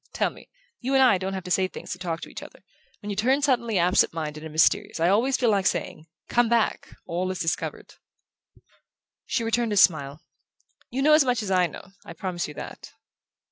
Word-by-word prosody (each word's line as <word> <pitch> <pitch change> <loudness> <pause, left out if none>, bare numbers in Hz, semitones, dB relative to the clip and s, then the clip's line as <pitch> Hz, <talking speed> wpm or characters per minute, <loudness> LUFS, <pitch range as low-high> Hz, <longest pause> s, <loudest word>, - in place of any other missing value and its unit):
Tell - - 0
me. - - -16 0.3
You 265 +2 -1
and 265 - +6
I 200 -8 +5
don't 190 +1 -3
have 190 - -5
to 180 - -7
say 185 +1 +2
things - - -9
to 185 - -5
talk 170 -3 -4
to - - -8
each - - -9
other. - - -13 0.4
When 205 - -4
you - - -3
turn 260 +7 +1
suddenly 235 -6 +1
absentminded 160 -3 +1
and 160 - -7
mysterious 185 +5 +2
I 170 +2 +3
always 245 +7 +2
feel 240 -3 +2
like 195 -2 +2
saying: 155 -3 -3 0.2
'Come 240 -1 +2
back. 235 -2 0
All 180 +2 -2
is 185 - -3
discovered'." 165 -1 -3 1.3
She 240 - -1
returned 230 -1 0
his 200 - +5
smile. 150 -2 0 0.7
"You 270 +2 -2
know 305 +1 +5
as 305 -1 +6
much 245 -4 0
as 195 - -4
I 180 -1 +3
know. 180 - -12
I - - -10
promise 175 0 -4
you 150 - -10
that." - - -9
195 Hz, 210 wpm, -25 LUFS, 175-235 Hz, 1.3 s, and